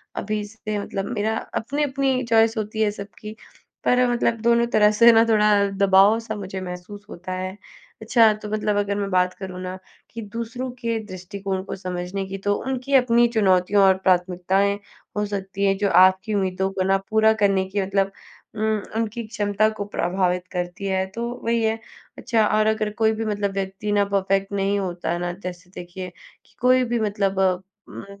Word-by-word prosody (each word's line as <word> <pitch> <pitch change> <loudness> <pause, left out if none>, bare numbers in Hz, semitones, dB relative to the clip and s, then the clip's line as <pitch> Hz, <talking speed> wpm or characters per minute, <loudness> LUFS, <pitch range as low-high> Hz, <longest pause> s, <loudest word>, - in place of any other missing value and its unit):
अभी 210 0 -2
से 215 0 -5
मतलब 195 -1 -4
मेरा 220 +2 0 0.3
अपनी-अपनी 270 0 0
चॉइस 225 0 +4
होती 220 0 -3
है 210 - +3
सबकी। 205 +1 -9 0.5
पर 250 - +3
अ, 250 - +4
मतलब 235 -1 0
दोनों 235 +1 +3
तरह 210 0 +6
से 235 0 +9
ना 225 0 +6
थोड़ा 210 -1 +4 0.3
दबाव-सा 210 +4 +4
मुझे 190 -2 -6
महसूस 185 +3 -8
होता 185 +2 -8
है। 185 +1 -4 0.4
अच्छा 225 -3 +5
तो 210 0 -8
मतलब 210 -1 0
अगर 200 0 0
मैं 200 -1 -2
बात 180 0 +2
करूँ 185 -1 -7
ना 185 0 -5 0.3
कि 230 - -7
दूसरों 230 +4 -5
के 230 -2 -1
दृष्टिकोण 190 0 -5
को 195 - -6
समझने 185 +1 -4
की 195 0 -5
तो 205 - +3
उनकी 265 +1 -3
अपनी 240 -2 +5
चुनौतियों 195 -1 +3
और 190 0 +6
प्राथमिकताएँ 190 +2 +1 0.4
हो 210 - +1
सकती 200 -1 -3
हैं, 195 0 +2
जो 200 -1 +1
आपकी 190 +3 +4
उम्मीदों 190 -1 0
को 190 -1 -1
ना 195 +1 +3
पूरा 220 0 +4
करने 195 -1 +3
की 200 +1 -1
मतलब 195 0 0 0.4
उम, 215 - -5 0.3
उनकी 230 +1 -2
क्षमता 210 0 +1
को 205 - -3
प्रभावित 180 0 0
करती 180 +1 -4
है, 190 0 0
तो 215 +5 -7 0.2
वही 230 0 +1
है। 220 0 0 0.4
अच्छा, 225 -3 +1
और 215 +1 +2
अगर 215 -1 +1
कोई 220 0 +4
भी 225 - -1
मतलब 205 -2 -1
व्यक्ति 195 +2 -3
ना 205 0 +3
परफ़ेक्ट 195 0 0
नहीं 200 0 0
होता 175 -3 -3
है 175 - -1
ना, 175 0 -2
जैसे 180 -1 -8
देखिए 180 +1 -7 0.4
कि - - -28
कोई 255 0 +4
भी 240 - +1
मतलब 200 -2 -1
उम, 190 +2 -3
200 Hz, 180 wpm, -23 LUFS, 190-220 Hz, 0.5 s, से